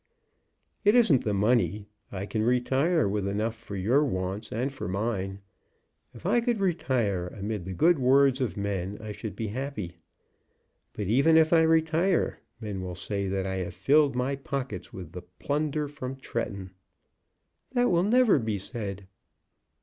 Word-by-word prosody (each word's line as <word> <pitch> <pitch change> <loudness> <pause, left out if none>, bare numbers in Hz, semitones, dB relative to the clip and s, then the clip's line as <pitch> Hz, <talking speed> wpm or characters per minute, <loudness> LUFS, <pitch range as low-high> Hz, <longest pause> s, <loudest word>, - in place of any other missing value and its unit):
It 205 +3 +5
isn't 205 - +4
the 105 - +1
money. 105 -2 +1 0.3
I 100 0 -4
can 110 +1 -2
retire 130 - +2
with 100 0 -1
enough 105 +3 -1
for 115 -3 -9
your 115 +10 +2
wants 100 -3 -3
and 130 +5 -2
for 135 - -5
mine. 95 0 -2 0.7
If 115 - -13
I 240 - +3
could 235 -2 0
retire 125 - 0
amid 100 0 -5
the 95 - -5
good 165 - +4
words 135 +1 +4
of 125 -5 -2
men 100 -1 -3
I 110 -1 -7
should 105 0 -6
be 110 -2 -3
happy. 105 - -5 1.0
But, 105 - -4
even 140 - +4
if 160 +1 +4
I 165 - +6
retire, 160 +3 +2 0.2
men 105 -4 -5
will 90 -1 -5
say 100 +2 -3
that 95 0 -1
I 95 0 -2
have 90 -1 -4
filled 140 +8 +3
my 125 +2 0
pockets 135 -1 -5
with 90 -4 -9 0.2
plunder 150 0 -1
from 135 -2 -6
Tretton." 100 -7 -5 1.0
"That 245 -3 +3
will 170 -1 +3
never 225 - +4
be 110 -3 -2
said." 100 -1 -6
115 Hz, 155 wpm, -27 LUFS, 100-145 Hz, 1.0 s, I